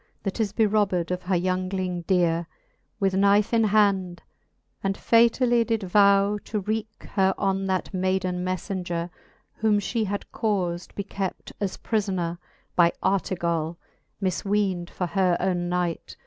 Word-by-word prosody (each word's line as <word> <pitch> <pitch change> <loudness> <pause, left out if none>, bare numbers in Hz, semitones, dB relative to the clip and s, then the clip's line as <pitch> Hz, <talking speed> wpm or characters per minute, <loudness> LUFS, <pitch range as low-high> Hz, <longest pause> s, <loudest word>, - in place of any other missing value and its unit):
That 195 +2 -3
is 215 -3 +1
berobbed 205 -5 +1
of 180 0 -2
her 185 +1 0
youngling 185 0 -1
dere, 170 -3 +2 0.5
With 195 -2 +1
knife 200 +3 +3
in 225 -1 +4
hand, 195 -4 +2 0.6
and 195 0 0
fatally 235 +1 +4
did 225 -2 -1
vow, 200 +2 +4
To 215 - -2
wreake 215 +2 -4
her 190 -1 +2
on 195 0 0
that 190 +1 -1
mayden 185 -1 0
mefi^ngere, 180 -2 -3 0.5
Whom 215 -1 +3
fhe 215 +2 -1
had 200 +1 -3
caufd 185 -5 -1
be 200 - -3
kept 195 -1 -5
as 200 -3 -2
prilbnere 185 -6 -1 0.4
By 170 -1 +5
Artegall^ 170 -4 0 0.4
mifween'd 190 -1 0
for 180 - -3
her 180 -1 +2
owne 175 -2 0
knight. 175 -2 -2
190 Hz, 135 wpm, -25 LUFS, 180-205 Hz, 0.6 s, By